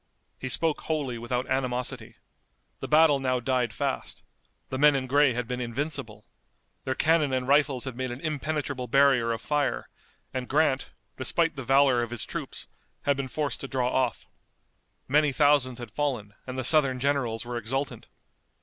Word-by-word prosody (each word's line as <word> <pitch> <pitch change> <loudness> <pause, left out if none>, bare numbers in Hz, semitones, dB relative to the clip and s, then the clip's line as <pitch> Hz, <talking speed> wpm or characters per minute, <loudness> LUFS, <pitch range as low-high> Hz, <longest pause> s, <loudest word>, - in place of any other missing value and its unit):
He 130 - -4
spoke 160 +4 +1
wholly 140 -7 -2
without 125 +2 -2
animosity. 125 -2 -2 0.6
The - - -5
battle 155 -2 +5
now 130 -1 0
died 125 -1 0
fast. - - -4 0.5
The 130 - -3
men 150 0 +6
in 135 -1 -1
gray 140 0 +3
had 125 0 -3
been 125 0 -3
invincible. 115 -4 -4 0.6
Their 130 - -1
cannon 155 -2 +2
and 130 -1 -1
rifles 140 -2 +2
had 130 -3 -5
made 130 +1 -3
an 120 +1 -6
impenetrable 145 -4 -3
barrier 135 -2 +4
of 115 - -3
fire, 145 -1 -1 0.4
and 130 -1 -4
Grant, 145 -2 +2 0.3
despite 165 +5 +2
the 135 - -5
valor 135 -1 +4
of 120 - -3
his 120 -2 -3
troops, - - -4 0.4
had 140 - +2
been 135 -1 -3
forced 145 +1 -3
to 135 - -5
draw 125 -2 -1
off. 130 -2 0 0.8
Many 150 +2 +3
thousands 140 -3 +3
had 120 -3 -7
fallen 125 -8 -2
and 130 0 -5
the 130 - -1
Southern 135 -2 +3
generals 125 -4 -1
were 120 0 -4
exultant. 130 +5 -3
130 Hz, 165 wpm, -27 LUFS, 125-145 Hz, 0.8 s, men